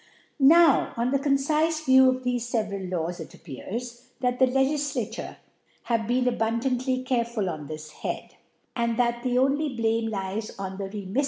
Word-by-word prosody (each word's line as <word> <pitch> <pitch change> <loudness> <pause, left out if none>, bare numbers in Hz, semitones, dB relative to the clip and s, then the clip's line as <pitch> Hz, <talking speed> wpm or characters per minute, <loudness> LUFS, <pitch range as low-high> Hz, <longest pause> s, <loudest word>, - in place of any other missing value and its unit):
Now, 315 +1 +5
on 240 +2 0
the 275 - +2
concifc 305 +3 +1
View 260 0 +7
of 255 0 -1
thefc 245 -1 -2
feve 215 -2 0 0.2
ral 175 -3 0
Laws, 175 +2 -4
it - - -9
appears, 235 - -7
that 250 -1 0
the 260 - +6
Legiflarure 275 +2 -1 0.5
have 230 -3 -1
been 250 +1 +1
abundantly 250 +2 0
careful 235 -5 -1
on 155 -4 -5
this 155 0 -8
Head - - -5
v - - -27 0.4
and 235 -1 0
that 240 -1 +1
the 250 0 0
only 275 +2 +1
Blame 225 -1 0
lies 200 +1 -3
on 190 -1 -5
the 200 - -2
RemiiT - - -7
• - - -14
5 - - -9
E. 200 +2 -5
245 Hz, 185 wpm, -26 LUFS, 220-265 Hz, 0.5 s, View